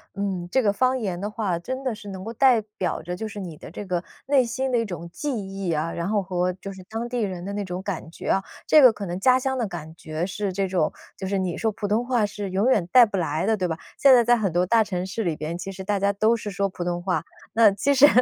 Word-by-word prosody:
嗯， 195 -3 -2
这 265 - +3
个 205 -2 +3
方 255 +4 +2
言 185 -6 -3
的 205 - -2
话， 205 -6 -2
真 260 +9 -5
的 255 -4 -1
是 205 -1 -9
能 190 -1 -7
够 225 - -5
代 250 0 +5 0.2
表 185 - -1
着 175 +2 -4
就 220 +4 -4
是 210 -1 -7
你 175 -5 -6
的 - - -11
这 205 - -7
个 180 -2 -1 0.2
内 270 -2 +4
心 260 +3 -2
的 240 - +3
一 230 - 0
种 175 -4 -6
记 295 +8 -3
忆 195 -3 -4
啊， 160 +1 -1
然 170 +2 -3
后 210 -1 +2
和 180 -1 0
就 195 +2 -8
是 190 - -11
当 225 +2 -3
地 245 0 -3
人 185 -4 -3
的 200 - -4
那 205 0 -2
种 180 -1 -5
感 190 -5 -4
觉 165 - -7
啊。 195 - +2 0.2
这 305 - +7
个 255 - +9
可 210 -2 -6
能 175 +1 -4
家 255 +5 +5
乡 265 0 -1
的 235 -4 0
感 160 -4 -7
觉 160 +1 -4
是 195 +1 -3
这 195 +1 -1
种， 180 -4 +1 0.3
就 190 - -4
是 195 +1 0
你 185 -3 -1
说 225 - 0
普 205 0 -4
通 215 +4 +1
话 245 -4 +2
是 205 -1 -5
永 195 +6 +2
远 180 -8 +2
带 245 +1 +8
不 210 - -5
来 160 -1 -1
的， 220 +1 +3
对 185 -3 -1
吧？ 160 - -3 0.2
现 275 -1 +7
在 240 -2 +7
在 240 +1 +5
很 210 -6 0
多 175 +2 +2
大 225 +4 +4
城 185 -3 -3
市 200 +4 -3
里 170 -4 0
边， 155 +3 -4
其 195 +2 -6
实 190 0 -7
大 200 0 0
家 200 +1 +2
都 215 +3 +3
是 215 -2 -5
说 200 +1 0
普 180 - -5
通 175 0 -2
话。 185 0 0 0.3
那 225 -2 +6
其 245 +9 +1
实， 280 +2 +8
200 Hz, 310 characters per minute, -24 LUFS, 180-225 Hz, 0.3 s, 个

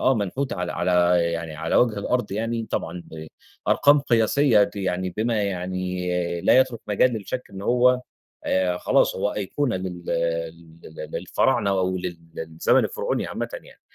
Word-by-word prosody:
آه 130 - +3
منحوت 115 +6 -2
على 90 0 -3
على 90 - -1 0.4
يعني 85 -2 -5
على 80 +1 -1
وجه 115 -4 +3
الأرض 120 0 -1
يعني 115 +2 -2
طبعًا 85 +1 -3
آآ، 80 0 -8 0.4
أرقام 145 0 +5
قياسية 115 -2 +3
دي 100 0 -2
يعني 95 0 -1
بما 110 -1 0
يعني 90 -2 -2
لا 130 - +5
يَترك 125 -3 -1
مجال 110 +4 +3
للشك 115 +4 -4
إن 95 0 -8
هو 125 +2 +3 0.4
آآ، 90 -1 +1
خلاص - - +2
هو 105 +2 -1
أيقونة 115 +3 -1
لل 90 -2 -6 0.8
ل 80 - -9
للفراعنة 100 - +1
أو 95 -1 0
لل 90 -2 -5 0.2
للزمن 80 0 +1
الفرعوني 485 +1 -2
عامةً - - -4
يعني. - - -11
100 Hz, 155 wpm, -24 LUFS, 90-120 Hz, 0.8 s, أرقام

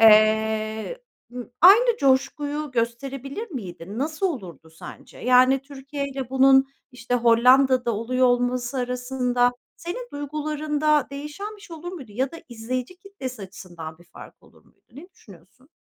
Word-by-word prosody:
eee, 220 - +4 0.6
aynı 455 +7 +7
coşkuyu 285 +2 0
gösterebilir 270 - -3
miydin? 195 - -7
Nasıl 310 +7 -1
olurdu 180 - -7
sence? 160 - -12
Yani 255 +2 +4
Türkiye'yle 275 -1 -6
bunun, 265 0 +5 0.3
işte, 245 0 -3
Hollanda'da 245 +1 +4
oluyor 255 +4 +1
olması 245 +1 0
arasında 250 0 0 0.2
senin 480 +9 -6
duygularında 300 0 0
değişen 300 +10 -7
bir - - -19
şey 340 -5 -10
olur 350 +3 -7
muydu 265 - -10
ya 260 +4 -1
da 330 - -7
izleyici 250 +7 -5
kitlesi 275 - -8
açısından 175 -4 -10
bir 175 - -19
fark - - -14
olur - - -22
muydu? - - -30
Ne 310 +8 -12
düşünüyorsun? 195 - -19
260 Hz, 130 wpm, -24 LUFS, 230-295 Hz, 0.6 s, aynı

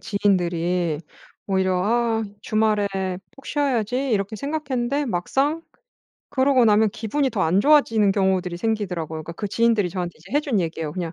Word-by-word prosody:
지인들이 175 -5 0 0.5
오히려 190 -2 +1
'아 230 0 +1 0.2
주말에 215 -1 +1 0.5
푹 270 - -16
쉬어야지.' 265 -2 0
이렇게 205 0 -1
생각했는데 280 -1 -2
막상 275 - 0 0.7
그러고 260 -2 +3
나면 215 0 +4
기분이 250 +7 -1
더 200 - -1
안 175 +5 +3
좋아지는 225 -7 +4
경우들이 190 -3 0
생기더라고요. 180 -7 -2
그러니까 170 - -8
그 205 +4 -5
지인들이 230 -2 +2
이제 175 - -12
저한테 175 -2 -3 0.2
해 290 - +3
준 255 -9 0
얘기예요. 160 -3 -3
"그냥 175 -2 -4
210 Hz, 390 characters per minute, -23 LUFS, 180-250 Hz, 0.7 s, 나면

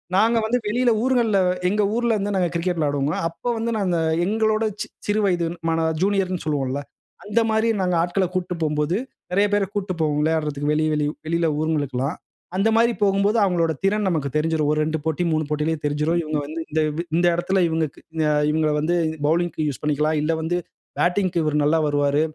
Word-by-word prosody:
நாங்க 225 +4 +4
வந்து 235 +3 +1
வெளியில 240 +3 +2
ஊர்கள்ல 240 -5 +2 0.3
எங்க 210 +2 +1
ஊர்லருந்து 215 -4 0
நாங்க 180 -2 +1
கிரிக்கெட் 175 +1 -1
விளையாடுவோம்ல! 145 -1 0
அப்ப 165 - -22
வந்து 230 +1 -1
நாங்க 185 -4 0 0.3
எங்களோட 220 +2 +1 0.4
சிறு 210 +1 +1
வயது 175 -3 +1 0.2
மாணவ 165 0 +1
ஜூனியர்ன்னு 190 -2 0
சொல்லுவோம்ல்ல, 140 -3 -1 0.4
அந்த 210 +3 +1
மாரி 220 +1 +2
நாங்க 180 -1 +1
ஆட்கள 180 +3 +1
கூட்ட்டு 180 -1 -2
போம்போது, 150 +4 0 0.3
நெறைய 200 +3 +3
பேர 205 -1 +3
கூட்ட்டு 195 -2 -2
போவோம். 150 -1 +1
விளையாடுறதக்கு 150 -2 0
வெளிய 155 +1 +1
வெளிய 150 -1 +1 0.2
வெளியில 170 0 +1
ஊர்ங்களுக்ல்லாம். 145 -2 -1 0.4
அந்த 210 +3 +3
மாதிரி 235 +1 +4
போகும்போது, 200 +2 +2
அவங்களோட 170 -3 +1
திறன் 205 0 +1
நமக்கு 150 -5 -1
தெரிஞ்சிரும். 155 -1 +1
ஒரு 155 - 0
2 160 0 -1
போட்டி, 160 +2 0
3 155 -1 0
போட்டிலயே 150 +2 0
தெரிஞ்சிரும். 150 +4 +1
இவுங்க 155 -1 -2
வந்து 155 +3 -6
இந்த 160 0 +1 0.2
வ் 170 - -2
இந்த 175 +1 +3
எடத்தில 190 +2 +1
இவுங்கக்கு 160 -2 -2 0.3
அ - - +3 0.2
இவுங்கள 155 -1 +1
வந்து 165 +4 +1 0.3
பவுலிங்க்கு 165 -1 0
யூசு 145 - -4
பண்ணிக்கலாம். 150 +1 +1
இல்லை 160 +1 +1
வந்து 170 +2 -1 0.4
பேட்டிங்க்கு 180 -1 +1
இவர் 150 0 +1
நல்லா 155 +3 +3
வருவாரு 145 0 +2
170 Hz, 175 wpm, -22 LUFS, 150-200 Hz, 0.4 s, நாங்க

